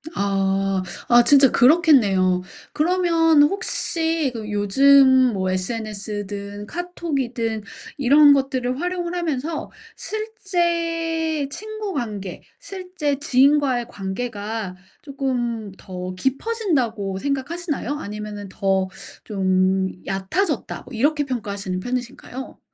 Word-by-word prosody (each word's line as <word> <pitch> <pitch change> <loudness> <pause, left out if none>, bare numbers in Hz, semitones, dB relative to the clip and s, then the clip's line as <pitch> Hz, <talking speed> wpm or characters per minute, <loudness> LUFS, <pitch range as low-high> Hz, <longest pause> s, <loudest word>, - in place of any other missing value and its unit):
아. 195 -1 0 0.3
아 240 0 +7
진짜 275 0 +6
그렇겠네요. 235 - +4 0.3
그러면 330 -2 +3
혹시 325 - 0
그 220 -2 -6
요즘 260 +5 +5
뭐 185 -1 -1
SNS든 205 0 -4
카톡이든 270 -11 -3 0.3
이런 285 +2 +6
것들을 265 -1 -1
활용을 355 0 -2
하면서 315 -2 -2 0.3
실제 335 -7 -1
친구 430 +1 -6
관계 205 -8 -5 0.2
실제 365 - -3
지인과의 275 -3 +3
관계가 205 0 -4 0.3
쪼끔 245 -7 -3
더 185 0 -6
깊어진다고 265 - -1
생각하시나요? 285 - -3
아니면은 210 -2 -6
더 190 -1 0 0.4
좀 190 -1 +1 0.2
얕아졌다 220 - -2
뭐 255 - -13
이렇게 290 +5 +1
평가하시는 200 -7 -4
편이신가요? 250 +3 -6
255 Hz, 240 characters per minute, -22 LUFS, 205-320 Hz, 0.4 s, 아